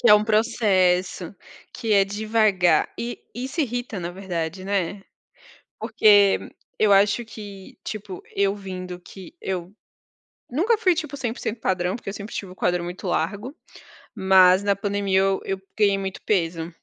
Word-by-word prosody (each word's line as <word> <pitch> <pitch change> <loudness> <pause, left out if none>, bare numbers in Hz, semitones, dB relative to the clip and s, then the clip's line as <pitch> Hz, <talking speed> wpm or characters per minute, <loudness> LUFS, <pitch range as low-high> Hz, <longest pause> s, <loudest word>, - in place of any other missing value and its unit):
Que - - +4
é 210 - +11
um 210 - +3
processo, 195 -5 +1 0.4
que 225 -3 -2
é 200 -1 +5
devagar. 210 -3 +2
E 240 +1 -4
e 245 - -4
isso 270 +6 -3
irrita 245 -6 -3
na 170 0 -4
verdade, 180 -1 -4
né? 195 0 -2 0.8
Porque 205 -2 +5 0.4
eu 215 -2 +4
acho 200 +4 +4
que, 205 -3 -11
tipo, 205 -4 -6
eu 200 0 +2
vindo 185 -2 -7
que 190 - -12
eu 180 -2 -4 0.8
nunca 395 - +2
fui, 375 -5 +3
tipo, 305 -3 -4
100% 235 -3 -4
padrão, 185 -1 0
porque 240 - -10
eu - - -2
sempre 205 +1 -8
tive 190 -3 -5
o - - -12
quadril 180 -1 0
muito 175 +1 -7
largo, 225 +8 -2 0.6
mas 190 0 +5
na 200 0 +2
pandemia 200 -1 0
eu 195 0 +1
eu 195 0 -3 0.2
ganhei 200 -2 +3
muito 195 -1 -5
peso. 170 -4 -1
200 Hz, 155 wpm, -23 LUFS, 185-220 Hz, 0.8 s, é